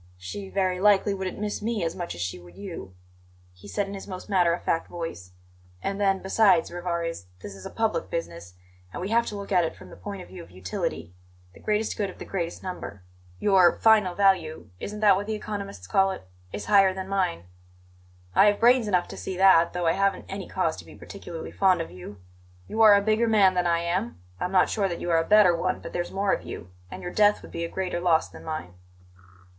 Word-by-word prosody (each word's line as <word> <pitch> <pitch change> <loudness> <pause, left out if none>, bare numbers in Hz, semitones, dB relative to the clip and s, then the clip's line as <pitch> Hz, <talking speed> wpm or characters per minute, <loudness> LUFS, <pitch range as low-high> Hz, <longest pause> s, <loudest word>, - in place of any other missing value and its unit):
"She 190 - -7
very 185 -2 0
likely 205 0 +4
wouldn't 190 -2 -4
miss 210 0 -3
me 220 -3 -1
as 165 0 -2
much 175 -1 -5
as 85 - -7
she 90 0 -3
would 85 0 -15
you," 170 - -8 0.6
he 90 +2 -15
said 195 - -1
in 200 - -7
his 195 - -8
most 185 +2 -8
matter 180 -3 +4
of 170 - -3
fact 165 - 0
voice. 165 - -7 0.5
"And 195 - -3
then, 195 -1 +2
besides, 190 -3 +3
Rivarez, 170 - -3 0.2
this 100 - -7
is 95 -1 -9
public 220 -7 0
business, 90 - -5 0.4
and - - -6
we 185 +3 -4
have 235 +1 +2
to 210 - -4
look 200 0 -8
at 180 -2 +4
it 160 - -3
from - - -14
the - - -10
point 200 -3 -7
of - - -14
view 95 - -9
of 85 - -13
utility 90 -2 -4 0.4
the - - -16
greatest 215 +1 -1
good 200 -2 0
of - - -11
the - - -8
greatest 170 -3 -4
number. 100 - -7 0.3
Your 185 - +4
'final 210 -5 +4
value' 180 - +1
isn't 210 +1 -6
that 205 -3 +6
what 205 +1 -4
the 220 - -1
economists 200 - -6
call 195 - +3
it? 190 - -7 0.2
is 105 0 -5
higher 195 -2 +5
than 190 0 -5
mine; 190 - -1 0.9
I - - +6
have 205 0 +2
brains 240 -1 +5
enough 180 -3 +1
to - - -8
see 190 - -5
that, 185 -3 +5
though 175 -1 -2
I 165 - +4
haven't 195 +1 0
any 195 -1 -6
cause 165 -4 0
to - - -10
be - - -14
particularly 175 -5 -8
fond 185 -2 +3
of 165 - -5
you. 90 +3 -10 0.5
You 220 - -1
are 215 -2 +9
a 200 - +2
bigger 220 +2 +2
man 200 -4 +5
than 180 -1 +1
I 170 0 +2
am; 185 +7 -2 0.2
I'm 180 - -2
not 185 -1 +4
sure 200 -3 0
that 170 - -4
you 175 - -2
are 165 - +4
a 165 - -3
better 205 -4 +6
one, 185 +2 -1
but - - -9
there's 175 0 -2
more 195 0 0
of - - -1
you, 90 +1 -9 0.2
and - - -9
your 175 - -5
death 210 -1 +3
would - - -12
be 170 - -4
a 170 - -3
greater 185 -1 -3
loss 170 -2 +2
than - - -13
mine." 155 - -5
185 Hz, 230 wpm, -26 LUFS, 165-200 Hz, 0.9 s, are